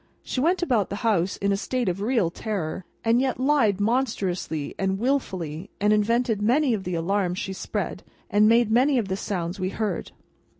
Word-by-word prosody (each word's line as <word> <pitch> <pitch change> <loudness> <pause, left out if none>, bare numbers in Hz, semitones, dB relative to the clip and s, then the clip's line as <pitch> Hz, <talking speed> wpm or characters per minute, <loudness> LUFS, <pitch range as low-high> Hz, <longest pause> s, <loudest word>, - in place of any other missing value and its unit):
She 255 - -2
went 350 +5 +2
about 235 - +1
the - - -3
house 195 -4 +1
in 200 0 0
a - - +3
state 245 +3 -2
of 185 +2 -1
real 215 -6 +1
terror, 190 -4 -4 0.2
and 230 +2 +4
yet 260 -2 -1
lied 255 -8 +3
monstrously 205 - -1
and 190 0 0
wilfully, 190 - -2
and 210 +1 +3
invented 225 +1 +1
many 255 +5 +3
of 195 -4 -3
the 180 -1 -2
alarms 180 +2 0
she 190 - -3
spread, - - -4 0.3
and 210 +1 +4
made 230 -1 +4
many 260 +4 +4
of 215 -5 -1
the 190 - 0
sounds 180 -2 -3
we 185 0 -1
heard. 205 -3 -3
210 Hz, 185 wpm, -25 LUFS, 190-240 Hz, 0.3 s, and